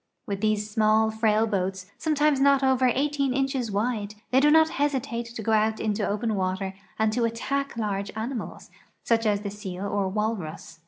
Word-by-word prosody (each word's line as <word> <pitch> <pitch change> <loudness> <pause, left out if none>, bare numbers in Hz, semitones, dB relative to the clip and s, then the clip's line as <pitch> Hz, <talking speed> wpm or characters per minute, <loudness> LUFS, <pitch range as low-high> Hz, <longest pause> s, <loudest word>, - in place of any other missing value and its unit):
With 200 -4 -4
these 215 -1 +1
small, 215 +1 +3
frail 220 0 +2
boats, 190 -3 -2
sometimes 300 -2 +2
not 275 0 +4
over 260 -1 +3
18 280 0 0
inches 270 -3 0
wide, 210 0 -1 0.2
they 260 - +5
do 295 +2 +5
not 320 +1 +6
hesitate 265 -5 -1
to 230 -1 -7
go 225 - 0
out 220 0 +2
into 215 -1 -1
open 215 +2 -1
water 190 0 -2 0.2
and 220 0 +1
to 240 +1 0
attack 255 +4 -2
large 200 -2 -2
animals, 225 +1 -5 0.3
such 225 -1 +2
as 205 -1 +1
the 200 -1 -4
seal 195 -2 -6
or 200 -1 -1
walrus. 185 -6 -4
220 Hz, 175 wpm, -26 LUFS, 205-260 Hz, 0.3 s, not